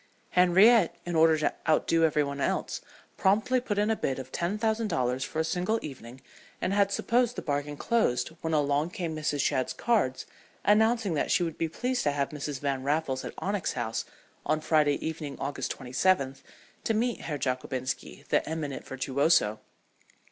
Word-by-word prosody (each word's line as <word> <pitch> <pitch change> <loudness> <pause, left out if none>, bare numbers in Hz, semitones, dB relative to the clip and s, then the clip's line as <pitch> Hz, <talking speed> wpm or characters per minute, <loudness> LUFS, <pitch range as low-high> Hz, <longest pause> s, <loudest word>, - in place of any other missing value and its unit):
Henriette, 185 +3 +5
in 175 -1 -3
order 160 0 +5
to 150 - 0 0.2
outdo 165 +1 +3
every 150 -1 +2
one 140 0 -4
else, - - -1 0.4
promptly 220 +7 +2
put 210 -5 -3
in 210 +2 +2
a - - +2
bid 135 -10 -2
of 130 -1 -8
ten 175 +5 -1
thousand 220 0 0
dollars 130 -6 0
for - - -6
a - - +3
single 180 +7 0
evening, 130 -3 -9 0.4
and 185 - -1
had 200 -1 +3
supposed 240 +3 +1
the - - -4
bargain 145 0 -2
closed 130 - +1
when 160 - -2
along 145 +1 +1
came 170 -3 -4
Mrs. 150 -2 -1
Shadd's 130 -3 0
cards 210 - 0 0.4
announcing 220 -1 +3
that 150 - 0
she 180 - +3
would 165 -2 -3
be 165 - 0
pleased 250 +9 -1
to 145 - +1
have 140 -1 -1
Mrs. 145 -2 -5
Van 140 -2 -1
Raffles 140 -1 -1
at - - -7
Onyx 200 -1 -2
House 115 -3 -2 0.4
on 155 - +1
Friday 155 -2 +3
evening, 155 -3 -5
August 140 +1 -3
27th, 135 +1 +1 0.4
to 225 - 0
meet 240 +2 0
Herr 150 -3 -3
Jockobinski, 130 0 -3
the - - +3
eminent 155 -4 -4
virtuoso. 135 -4 +2
155 Hz, 175 wpm, -28 LUFS, 140-200 Hz, 0.4 s, Henriette